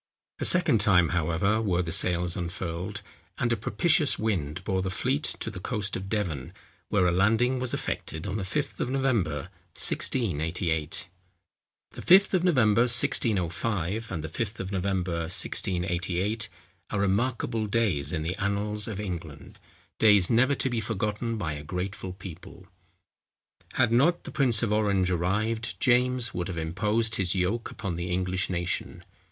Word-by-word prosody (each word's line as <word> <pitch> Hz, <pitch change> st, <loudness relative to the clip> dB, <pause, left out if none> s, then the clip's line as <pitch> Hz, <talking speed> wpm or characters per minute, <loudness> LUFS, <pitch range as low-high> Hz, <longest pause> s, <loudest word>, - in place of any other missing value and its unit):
A -, -, 0 dB
second 165 Hz, -10 st, +4 dB
time, 95 Hz, -5 st, +4 dB
however, 90 Hz, +6 st, +1 dB
were 90 Hz, -4 st, +1 dB
the 85 Hz, -, -4 dB
sails 90 Hz, -1 st, +2 dB
unfurled, 90 Hz, +3 st, -4 dB, 0.3 s
and 120 Hz, 0 st, +1 dB
a -, -, +2 dB
propitious 135 Hz, +7 st, +2 dB
wind 90 Hz, -7 st, -2 dB
bore 95 Hz, -1 st, 0 dB
the 95 Hz, -, -2 dB
fleet 130 Hz, +9 st, 0 dB, 0.2 s
to 115 Hz, -, -3 dB
the 95 Hz, -, -7 dB
coast 105 Hz, 0 st, -2 dB
of 95 Hz, +1 st, -5 dB
Devon, 90 Hz, -, -3 dB, 0.4 s
where 95 Hz, -3 st, +3 dB
a 90 Hz, -, +3 dB
landing 115 Hz, +8 st, +2 dB
was 130 Hz, -1 st, 0 dB
effected 80 Hz, 0 st, -4 dB
on 100 Hz, +1 st, -2 dB
the 100 Hz, -, -3 dB
Fifth 140 Hz, +10 st, -3 dB
of -, -, -1 dB
November, 105 Hz, -, 0 dB, 0.3 s
1688. 80 Hz, -, -1 dB, 0.8 s
The -, -, -9 dB
Fifth 195 Hz, +3 st, +6 dB
of 180 Hz, -2 st, +2 dB
November, 120 Hz, -, +4 dB
1605, 105 Hz, -2 st, +1 dB
and 80 Hz, -, -3 dB
the -, -, -3 dB
Fifth 105 Hz, +6 st, -4 dB
of 95 Hz, +1 st, -4 dB
November, 95 Hz, -3 st, -1 dB
1688, 90 Hz, +4 st, -1 dB, 0.4 s
are 100 Hz, -, -2 dB
remarkable 110 Hz, +2 st, 0 dB
days 100 Hz, -10 st, 0 dB
in 80 Hz, -2 st, -2 dB
the 85 Hz, +3 st, -2 dB
annals 105 Hz, +1 st, 0 dB
of 105 Hz, -3 st, -5 dB
England—days 90 Hz, -, -1 dB
never 130 Hz, +5 st, +4 dB
to 135 Hz, -, +1 dB
be 120 Hz, -, 0 dB
forgotten 110 Hz, +2 st, -2 dB
by 85 Hz, -7 st, -2 dB
a 75 Hz, 0 st, -7 dB
grateful 90 Hz, +3 st, -4 dB
people. 95 Hz, -3 st, -11 dB, 1.1 s
Had 120 Hz, -, +2 dB
not 145 Hz, +9 st, +3 dB
the -, -, -8 dB
prince 120 Hz, -6 st, +3 dB
of 105 Hz, -2 st, +1 dB
Orange 100 Hz, -4 st, +2 dB
arrived, 105 Hz, +6 st, -1 dB
James 125 Hz, 0 st, +2 dB
would 90 Hz, -1 st, -3 dB
have 90 Hz, -3 st, -5 dB
imposed 105 Hz, +8 st, 0 dB
his 95 Hz, -1 st, +1 dB
yoke 95 Hz, +6 st, -1 dB
upon 95 Hz, -5 st, -5 dB
the 85 Hz, +1 st, -4 dB
English 90 Hz, +1 st, -1 dB
nation. 85 Hz, -2 st, -3 dB
100 Hz, 155 wpm, -27 LUFS, 90-115 Hz, 1.1 s, Fifth